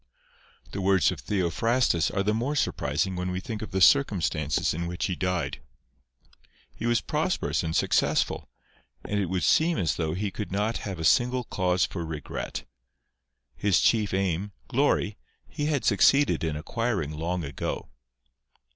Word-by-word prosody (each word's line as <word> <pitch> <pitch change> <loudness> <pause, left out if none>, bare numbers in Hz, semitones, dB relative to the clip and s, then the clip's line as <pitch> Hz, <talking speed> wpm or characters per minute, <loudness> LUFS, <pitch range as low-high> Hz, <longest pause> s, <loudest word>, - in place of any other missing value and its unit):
The 100 - -4
words 95 -3 +3
of - - -6
Theophrastus 100 +1 +1
are 95 - -1
the 105 +2 +1
more 125 +7 -1
surprising 95 -8 0
when 90 0 -2
we 90 0 -2
think 105 +2 -6
of 110 - -5
the 95 - -2
circumstances 90 - +3
in 85 +2 -3
which 90 0 -2
he 95 - -1
died. 90 -4 -2 1.1
He 115 - -4
was 120 0 +2
prosperous 160 +5 -1
and 80 -1 -3
successful; - - +1 0.5
and 105 - -1
it 100 - 0
would 90 +1 -1
seem 165 0 +3
as 80 -4 0
though 80 -1 -1
he 100 +1 -2
could 105 +1 -5
not 105 +4 0
have 95 - -5
a 80 - -5
single 125 +8 +3
cause 90 -4 +1
for 85 - -5
regret. 75 -6 -5 1.0
H:s 100 -3 +4
chief 110 -3 +2
aim, 95 +1 -1
glory, 130 -5 +1 0.3
he 150 -1 -3
had 145 -4 0
succeeded 135 +7 +4
in 80 -2 -1
acquiring 100 0 -2
long 85 +3 -3
ago. 70 -3 -4
95 Hz, 155 wpm, -27 LUFS, 85-115 Hz, 1.1 s, H:s